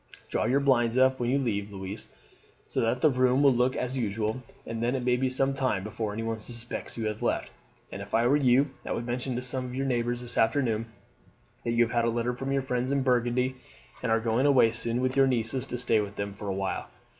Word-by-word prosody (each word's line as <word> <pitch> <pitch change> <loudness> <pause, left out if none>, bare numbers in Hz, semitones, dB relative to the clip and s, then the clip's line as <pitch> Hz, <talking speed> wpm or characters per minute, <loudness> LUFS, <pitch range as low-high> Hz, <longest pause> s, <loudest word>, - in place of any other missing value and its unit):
Draw - - 0
your 130 +5 +3
blinds 120 -3 +3
up 130 0 +4
when 120 -1 0
you 135 - +3
leave, 105 -6 -1
Louise, 95 +2 -6 0.5
so - - -2
that 115 +2 0
the 155 - +6
room 130 +2 +3
will 140 -2 +6
look 125 +1 +2
as 125 +1 -2
usual, 110 +2 -1 0.2
and 115 0 -4
then 120 +3 +1
it 125 -2 -2
may 125 -1 +3
be 130 +1 0
some 135 +1 +1
time 130 -8 0
before 105 0 -3
anyone 115 +1 -3
suspects 120 +1 -4
that 115 - -5
you - - 0
have 105 0 -4
left; - - -1 0.4
and - - -6
if - - -4
I 115 +1 +3
were 130 +4 +4
you 135 0 +3
I - - -3
would 115 - -3
mention 125 +1 -2
to 125 - -3
some 130 +1 -2
of 125 0 -6
your 135 +1 -1
neighbours 120 -1 0
this 120 0 -4
afternoon 115 -2 +1 0.8
that 115 - -1
you 120 0 +5
have 115 - -3
had 120 -1 +2
a - - +2
letter 120 +1 -1
from 135 +2 -4
your 135 -1 +1
friends 125 0 -1
in 140 -1 +1
Burgundy, 125 0 +1 0.4
and 125 - -1
are 115 - +4
going 115 +4 +1
away 130 -5 +5
soon 115 +1 -2
with 130 0 0
your 135 -1 +5
nieces 125 +1 0
to 125 - -4
stay 115 -3 +2
with 100 0 -6
them 100 0 -4
for 105 +1 -8
a 95 - -1
while. 95 0 -2
120 Hz, 250 wpm, -28 LUFS, 115-130 Hz, 0.8 s, the